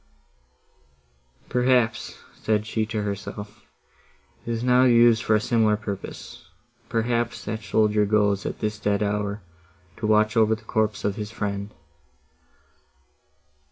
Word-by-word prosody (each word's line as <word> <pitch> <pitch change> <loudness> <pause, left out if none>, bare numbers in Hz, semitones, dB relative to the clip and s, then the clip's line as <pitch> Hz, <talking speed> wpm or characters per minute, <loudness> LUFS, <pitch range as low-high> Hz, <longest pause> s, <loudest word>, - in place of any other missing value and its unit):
"Perhaps," 125 -2 +1 0.2
said 105 -1 -1
she 110 0 -2
to 110 -2 -2
herself, 105 +1 -6 0.9
"it - - -3
is 115 0 -2
now 125 0 +4
used 120 -2 +5
for 110 - +2
a - - +3
similar 110 -1 +2
purpose; 100 -2 -7 0.5
perhaps, 120 +1 -1
that 110 +1 -4
soldier 105 0 +2
goes, 105 -1 +2
at - - -6
this 105 -1 -2
dead 105 0 0
hour, 105 -1 -2 0.5
to 110 - -2
watch 110 0 +3
over 110 -1 +4
the 110 - -16
corpse 110 -1 -1
of 100 0 -1
his 105 -1 -4
friend!" 100 -2 -4
110 Hz, 125 wpm, -24 LUFS, 105-115 Hz, 0.9 s, used